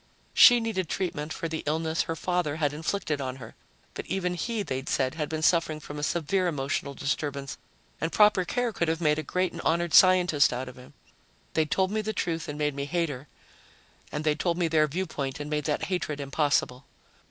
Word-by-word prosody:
She 245 0 +8
needed 215 -7 -2
treatment 160 -5 -3
for 165 - -3
the 160 -1 -4
illness 160 +1 0
her 165 - -3
father 175 -3 -1
had 145 -2 0
inflicted 155 -1 -2
on 130 -1 -3
her. 115 -4 -11 0.4
But - - -7
even 180 -2 -1
he, 220 +4 -2
they'd 135 -6 -4
said, 130 -1 +1
had 150 -2 -3
been 155 0 -3
suffering 165 -2 +2
from 150 -1 -8
a - - -4
severe 170 +4 0
emotional 140 -2 -2
disturbance 140 0 -3 0.4
and 165 - -1
proper 210 -3 +5
care 240 +5 -1
could 170 - 0
have 160 0 0
made 150 -2 +2
a - - 0
great 180 +4 -1
and - - -7
honored 170 -1 0
scientist 180 -6 +6
out 125 +1 -4
of 125 - -9
him. 125 0 -15 0.6
They'd 155 -1 +1
told 190 +3 +1
me 215 0 0
the 220 +1 -3
truth 165 -4 -2
and 150 - -5
made 150 -1 0
me 140 0 -3
hate 170 +2 0
her, 135 +1 -7 0.8
and 150 - -3
they'd 155 0 +1
told 175 -2 0
me 175 -2 +1
their 155 -1 +3
viewpoint 150 -4 -3
and 145 +1 -6
made 150 -1 -1
that 150 0 -1
hatred 160 -4 -2
impossible. 140 -2 0
155 Hz, 210 wpm, -27 LUFS, 145-180 Hz, 0.8 s, She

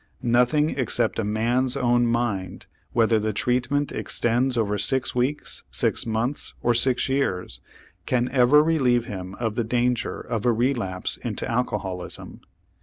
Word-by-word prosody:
Nothing 125 +6 +3
except 120 -4 0
a - - 0
man's 120 +5 +1
own 120 -2 +2
mind, 115 -6 -2 0.3
whether 115 -1 +3
the 110 0 -2
treatment 125 +6 0
extends 120 +2 0
over 105 -2 +1
six 130 +6 0
weeks, 130 +4 -2
six - - 0
months, 115 +5 -1
or 120 - +3
six 125 +2 +1
years, 95 - -1 0.5
can 125 -1 +1
ever 135 +3 +5
relieve 130 -7 +2
him 95 -2 -7
of 115 -3 -2
the 120 - -1
danger 120 +1 -1
of 110 -2 -4
a 120 - +3
relapse 115 -6 0
into - - -4
alcoholism. 100 -7 -4
120 Hz, 140 wpm, -24 LUFS, 110-125 Hz, 0.5 s, ever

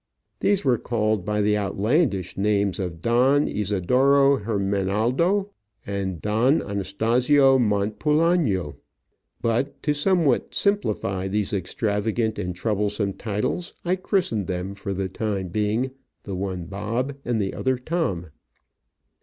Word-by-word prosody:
These 200 -5 +1
were 125 -3 +3
called 110 -4 0
by 105 0 0
the 105 0 +3
outlandish 105 - 0
names 100 -1 +1
of 85 -3 -5
Don 130 +5 +3
Isidoro 130 +8 +3
Hermenaldo 110 - 0 0.4
and 95 -3 -3
Don 115 - +2
Anastasio 120 +8 +2
Montpulano, 110 - +1 0.7
but, 120 +4 -1
to 150 - +2
somewhat 150 -3 +1
simplify 105 - 0
these 105 +1 -1
extravagant 105 +3 -1
and 90 0 -3
troublesome 105 0 -1
titles, 110 - -3
I 180 +2 +2
christened 180 - 0
them, 95 +1 -3
for 100 0 -6
the 95 0 -2
time 95 -1 -3
being, 110 +7 0 0.3
the 100 - -6
one 90 -2 -3
Bob 115 +9 -3
and 120 -2 -1
the 95 -2 -1
other 130 -1 0
Tom. 125 - -2
105 Hz, 120 wpm, -24 LUFS, 100-130 Hz, 0.7 s, were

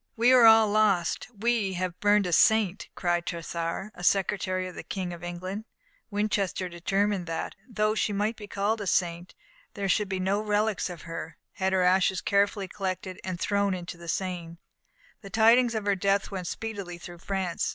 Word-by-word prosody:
"We 235 +2 +4
are 250 -2 +7
all 225 -1 +8
lost; 205 -5 +2
we 220 -3 0
have 180 -1 -3
burnt 205 -1 +4
a 175 - -1
saint!" 210 +1 +3
cried 175 -1 0
Tressart, 170 +3 -4
a 180 - -11
secretary 185 -1 +1
of 180 - -8
the - - -7
King 185 -3 -4
of 170 0 -10
England. 185 +5 -5 0.4
Winchester 205 -3 -1
determined 190 +2 -1
that, 165 0 -3 0.2
though 215 -2 +1
she 215 - 0
might 210 +3 0
be 210 -2 -10
called 205 +2 -1
a 200 - -4
saint, 175 0 -1 0.4
there 200 -2 -2
should 200 +2 +1
be 190 -1 -2
no 195 +3 +1
relics 210 -2 0
of 175 -2 -8
her 165 -1 -7
had 190 -2 -1
her 190 -1 +2
ashes 185 +1 +3
carefully 200 0 +1
collected 185 -1 -4
and 185 -2 -4
thrown 200 0 +1
into 180 0 -7
the 170 0 -12
Seine. 170 -2 -3 0.6
The 200 - -10
tidings 230 +3 +4
of 215 -2 -2
her 200 -1 +2
death 195 +2 +1
went 185 -3 -4
speedily 200 -5 -5
through 175 0 -10
France. 190 -2 -2
195 Hz, 185 wpm, -27 LUFS, 180-210 Hz, 0.6 s, all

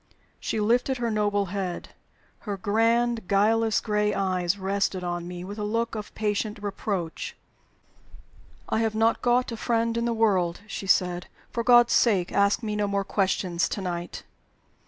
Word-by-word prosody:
She 220 - -2
lifted 245 +5 +2
her 235 -1 -1
noble 205 -1 +1
head. 185 -3 -3 0.5
Her 205 -3 -5
grand, 225 +2 +1
guileless 220 +2 +3
gray 210 -1 0
eyes 185 -1 0
rested 195 -1 -1
on 175 -1 -3
me 175 0 -6
with 200 +3 -7
a - - -2
look 230 +2 -1
of 215 -2 -6
patient 210 0 -1
reproach. 200 -4 -4 1.3
"I - - 0
have 225 -1 0
not 225 +1 +2
got 245 0 +2
a 230 - -5
friend 230 0 0
in 235 0 0
the 235 - +1
world," 195 -6 +1
she 210 -2 -6
said. 180 -1 +2 0.2
"For 235 - -2
God's 240 0 +6
sake, 195 -7 +3
ask 200 +4 +2
me 210 -1 -2
no 210 -1 0
more 200 0 0
questions 185 -3 0
to - - -3
night!" 175 -2 -5
210 Hz, 160 wpm, -26 LUFS, 190-225 Hz, 1.3 s, God's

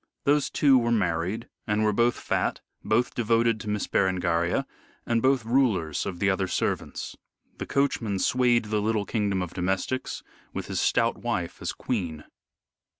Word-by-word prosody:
Those 140 -1 +2
two 135 -3 +4
were 120 0 0
married 95 +1 0 0.2
and 105 0 +1
were 105 -1 +2
both 120 +3 +3
fat, - - -1 0.2
both 115 +3 +1
devoted 115 -1 +2
to 105 - -6
Miss 105 -1 -1
Berengaria, 85 -2 +1 0.4
and 115 -1 +1
both 130 -2 +2
rulers 110 - +1
of 95 -3 -4
the 100 - +1
other 95 -1 +1
servants. - - -2 0.4
The - - -4
coachman 120 -7 0
swayed 120 +2 +2
the 105 0 0
little 110 -1 0
kingdom 100 -4 0
of 90 - -7
domestics 95 +8 -2 0.3
with - - -4
his - - -2
stout - - +2
wife - - -3
as - - -2
queen. 85 -11 -3
110 Hz, 155 wpm, -26 LUFS, 95-120 Hz, 0.4 s, two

